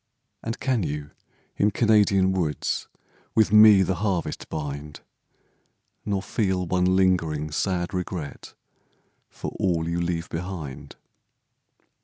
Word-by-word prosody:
And 115 +1 -4
can 130 -4 0
you 75 -3 -4 0.5
in 105 - +3
Canadian 105 -3 +3
woods 85 -5 -1 0.5
With 110 -1 +3
me 105 -2 +8
the 95 +1 0
harvest 95 -5 -2
bind, 75 0 -6 1.0
Nor 100 -2 -1
feel 95 -4 -1
one 90 +1 +2
lingering, 80 -5 +1
sad 90 +2 -1
regret 90 -5 -5 0.7
For - - -7
all 85 -4 +1
you 85 +1 -1
leave 85 0 -2
behind? 80 -6 -6
90 Hz, 110 wpm, -25 LUFS, 80-100 Hz, 1.0 s, me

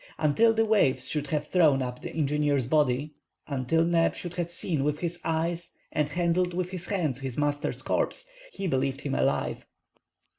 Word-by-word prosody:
Until 160 +10 +4
the 225 0 +2
waves 135 - +3
should 150 0 -2
have 150 0 -1
thrown 150 -6 +3
up 125 0 -5
the - - -5
engineer's 145 -3 +1
body—until 145 +1 0
Neb 165 0 +2
should 175 -1 -6
have 175 -1 -2
seen 165 -4 -1
with 150 +1 0
his 175 +1 -3
eyes 165 +1 -1 0.2
and 150 -1 0
handled 175 +1 +1
with 180 0 -2
his 180 -2 -4
hands 155 -10 -1
his 135 -3 -4
master's 145 0 -1
corpse, - - -1 0.2
he 195 - -5
believed 135 -3 0
him 140 - -3
alive. - - 0
155 Hz, 170 wpm, -27 LUFS, 140-175 Hz, 0.2 s, Until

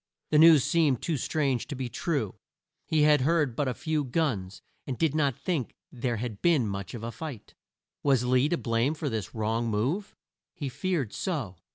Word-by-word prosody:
The 150 - +5
news 160 -4 +8
seemed 150 -7 +2
too 165 - 0
strange 135 -2 0
to 145 - -5
be 130 -1 -3
true. 135 - -2 0.5
He 155 -2 +3
had 150 -2 +5
heard 150 -3 +2
but 145 - 0
a 125 - -1
few 155 -2 -1
guns, 110 - -2 0.2
and 130 -3 -3
did 160 -4 +1
not 140 -5 +1
think 140 -3 -2 0.2
there 120 -2 -2
had 110 -2 -5
been 160 -8 +3
much 100 +1 -5
of 115 - -7
a 115 - -3
fight. 140 -6 -8 0.5
Was 135 -4 +3
Lee 130 +3 +3
to 175 - +1
blame 115 +5 0
for 150 -1 -3
this 110 -4 -4
wrong 115 +2 0
move? 130 - -1 0.4
He 145 -6 -4
feared 155 - -2
so. 135 - -3
135 Hz, 190 wpm, -28 LUFS, 115-155 Hz, 0.5 s, news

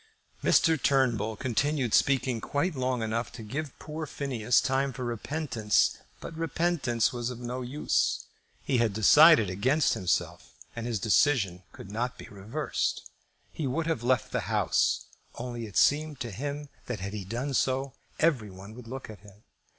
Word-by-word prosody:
Mr. 160 -3 +4
Turnbull 120 -6 +2
continued 130 +1 0
speaking 130 -4 +2
quite 145 - -1
long 130 -3 -1
enough 115 +2 -2
to 115 - -8
give 140 +6 -5
poor 155 0 -6
Phineas 125 -5 +1
time 135 +1 0
for 125 0 -5
repentance; 120 -2 0 0.2
but 165 - -8
repentance 160 -9 0
was 120 -1 -2
of 125 - -6
no 125 +1 -4
use. 130 +5 0 0.4
He 130 -3 +1
had 115 -3 +2
decided 115 - +7
against 130 +12 +2
himself, 90 -3 -2 0.2
and 115 0 -4
his 115 -4 -1
decision 100 -3 +2
could 95 - -11
not 120 +4 -2
be - - -10
reversed. 100 +2 -3 0.4
He 155 - -3
would 155 +6 -1
have 160 -7 -1
left 125 +1 +1
the - - -2
House, - - +1 0.3
only 120 -1 -5
it 105 - -6
seemed 150 -1 +3
to 120 -3 -4
him 145 +7 -5 0.2
that 125 -4 -3
had 100 +2 -5
he 105 -2 -4
done 120 +8 -3
so 135 +1 0 0.3
every 140 -10 +2
one 95 +3 -11
would 120 0 -11
look 130 +2 -7
at 110 -2 -10
him. 105 +1 -18
125 Hz, 165 wpm, -28 LUFS, 110-140 Hz, 0.4 s, decided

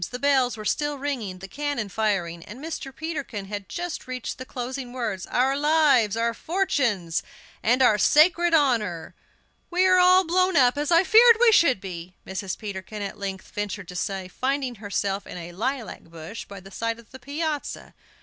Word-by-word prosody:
The 250 - -5
bells 260 -3 +2
were 215 - -8
still 295 +5 0
ringing, 255 -10 -3
the 190 +1 -9
cannon 285 -2 -3
firing, 185 -5 -1
and 220 - -10
Mr. 305 -2 -6
Peterkin 285 -9 -5
had 200 -1 -6
just 350 -4 -5
reached 255 -1 -5
the 255 - -6
closing 250 0 -5
words: 230 -7 -3
"Our 265 +2 +2
lives, 285 -8 +3
our 230 0 +1
fortunes, 235 - 0 0.4
and 250 +4 +3
our 215 -4 +4
sacred 340 - +5
honor." 220 - +1 0.6
"We 365 +1 +2
are 370 -1 +5
all 365 +1 +6
blown 365 +1 +2
up, 250 -2 +5
as 295 +3 -2
I 335 +2 +6
feared 460 +3 +7
we 485 -1 +6
should 310 - +4
be," 180 -1 -8
Mrs. 190 0 -4
Peterkin 205 0 -6
at 200 - -6
length 195 -1 -6
ventured 205 -2 -4
to 180 - -8
say, 190 0 -3
finding 265 +5 -2
herself 200 -1 -2
in - - -8
a 175 0 -7
lilac 240 +6 -3
bush 165 +6 -9
by 200 -1 -10
the 195 +1 -14
side 230 +2 -2
of 235 -2 -17
the 260 - -11
piazza. 295 +3 -4
245 Hz, 180 wpm, -25 LUFS, 200-295 Hz, 0.6 s, feared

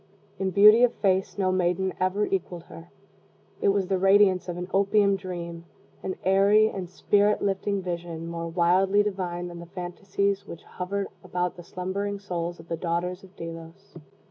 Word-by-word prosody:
In 190 -1 0
beauty 210 +4 +7
of 245 - +3
face 190 -1 0
no 190 -2 +1
maiden 185 +1 0
ever 185 +3 +1
equaled 180 -3 -3
her. 170 0 -13 0.7
It - - +2
was 200 -1 +2
the 190 0 0
radiance 195 -1 +4
of 175 - -4
an 180 0 -5
opium 200 0 +3
dream 170 -3 -6 0.4
an 185 - -3
airy 200 +3 +4
and 185 -4 -6
spirit 205 +3 +2
lifting 200 0 -1
vision 170 -2 -5
more 170 0 -4
wildly 185 +4 +3
divine 180 -3 -3
than 175 -1 -8
the 170 - -10
phantasies 195 +3 -2
which 170 - -9
hovered 195 +2 -4 0.2
about 180 0 -2
the 175 - -11
slumbering 195 +3 -3
souls 175 -3 -4
of 165 - -13
the 165 - -3
daughters 180 +2 -2
of 190 0 -16
Delos. 165 +4 -9
185 Hz, 170 wpm, -26 LUFS, 175-200 Hz, 0.7 s, beauty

